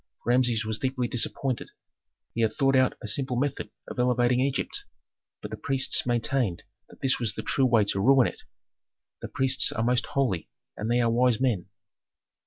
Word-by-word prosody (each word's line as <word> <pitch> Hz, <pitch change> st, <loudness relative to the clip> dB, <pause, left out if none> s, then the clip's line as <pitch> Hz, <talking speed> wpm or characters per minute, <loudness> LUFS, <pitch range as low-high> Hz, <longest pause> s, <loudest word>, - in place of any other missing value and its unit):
Rameses 120 Hz, -2 st, +2 dB
was 110 Hz, 0 st, -2 dB
deeply 130 Hz, -2 st, -1 dB
disappointed. 125 Hz, +2 st, -2 dB, 0.6 s
He 115 Hz, -, -2 dB
had 110 Hz, -1 st, +1 dB
thought 135 Hz, -1 st, +2 dB
out 130 Hz, -1 st, +2 dB
a -, -, -4 dB
simple 130 Hz, +4 st, 0 dB
method 140 Hz, +2 st, -2 dB, 0.2 s
of -, -, -7 dB
elevating 125 Hz, 0 st, +2 dB
Egypt, 135 Hz, +1 st, -2 dB, 0.6 s
but -, -, -7 dB
the -, -, -5 dB
priests 135 Hz, -2 st, +1 dB
maintained 120 Hz, -5 st, 0 dB, 0.3 s
that -, -, -18 dB
that 135 Hz, -, +1 dB
was 110 Hz, -3 st, -2 dB
the -, -, -5 dB
true 135 Hz, -1 st, +1 dB
way 115 Hz, -4 st, +3 dB
to 100 Hz, -, 0 dB
ruin 130 Hz, +4 st, +5 dB
it. -, -, -5 dB, 0.8 s
The -, -, -5 dB
priests 130 Hz, 0 st, +3 dB
are 110 Hz, -, -2 dB
most 125 Hz, +1 st, +1 dB
holy, 120 Hz, -11 st, -1 dB, 0.3 s
and 105 Hz, -, -4 dB
they 120 Hz, +1 st, +2 dB
are 115 Hz, -1 st, +2 dB
wise 120 Hz, -1 st, +2 dB
men. 115 Hz, -9 st, 0 dB
125 Hz, 180 wpm, -26 LUFS, 115-130 Hz, 0.8 s, ruin